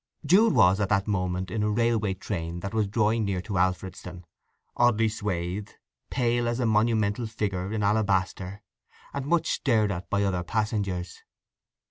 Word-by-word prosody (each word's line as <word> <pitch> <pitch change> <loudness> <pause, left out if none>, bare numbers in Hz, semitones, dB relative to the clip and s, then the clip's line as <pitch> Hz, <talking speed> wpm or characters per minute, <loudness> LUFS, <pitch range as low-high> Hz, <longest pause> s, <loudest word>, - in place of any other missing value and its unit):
Jude 200 +8 +5
was 95 +2 +5
at 100 -2 0
that 100 -1 +2
moment 90 -2 -2
in 110 - -1
a 105 - +1
railway 110 -2 +1
train 85 -3 -4
that 100 +3 -5
was 110 -2 +1
drawing 110 +2 +1
near 100 -3 -1
to 100 -3 -2
Alfredston, 90 -1 -2 0.5
oddly 115 -2 +3
swathed, 100 -2 -3 0.3
pale 120 -2 +1
as 120 +1 -1
a 125 - +1
monumental 110 0 +1
figure 100 -3 -3
in 110 -1 -1
alabaster, 100 -2 0 0.5
and 140 -1 -4
much 170 +1 +2
stared 110 -6 +1
at 90 -1 -5
by 100 0 +1
other 95 -3 0
passengers. 100 -2 -2
105 Hz, 155 wpm, -27 LUFS, 95-110 Hz, 0.5 s, Jude